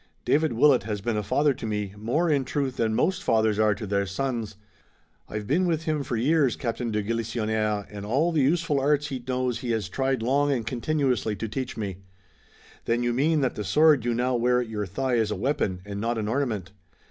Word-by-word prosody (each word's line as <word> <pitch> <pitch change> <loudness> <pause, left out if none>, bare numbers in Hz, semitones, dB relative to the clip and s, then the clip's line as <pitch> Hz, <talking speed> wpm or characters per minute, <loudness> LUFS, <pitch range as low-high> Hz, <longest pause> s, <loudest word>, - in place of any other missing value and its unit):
"David 155 -2 +2
Willet 130 +1 +5
has 105 0 -4
been 110 +3 -2
a 105 - 0
father 140 +8 +2
to 115 - -6
me, 105 -2 -3
more, 120 +11 0
in 145 -4 +2
truth, 130 0 -2
than 110 -1 +1
most 185 +8 +1
fathers 110 -2 +2
are 105 -1 +3
to 110 - -6
their 100 0 0
sons. 115 0 -3 0.7
I've 105 -1 -4
been 175 - +2
with 165 -2 0
him 155 -2 -1
for 125 -3 -3
years, 140 +1 +2
Captain 115 0 -3
de 105 -1 -1
Galisonnière, 110 -2 -1
and 100 -1 -8
all 135 +11 +1
the 160 -3 +2
useful 155 +1 +2
arts 145 +2 +1
he 130 -3 -5
knows 125 -2 -1
he 120 - -5
has 105 -6 -2
tried 130 +2 -1
long 140 +4 +2
and 120 -5 -1
continuously 125 -3 0
to 110 +3 -4
teach 130 +3 -4
to - - -8
me." 95 -4 -4 0.9
"Then 120 +1 +1
you 120 0 +1
mean 150 +5 +2
that 130 - +1
the 105 - -4
sword 150 +6 +4
you 120 -1 0
now 125 +2 0
wear 125 +1 +2
at 125 - -2
your 105 -2 -3
thigh 125 +6 -1
is 110 -2 +1
a 105 - -1
weapon 100 -9 -1
and 100 0 -5
not 115 +1 -1
an 105 -1 -2
ornament?" 110 -7 -2
120 Hz, 220 wpm, -26 LUFS, 110-140 Hz, 0.9 s, Willet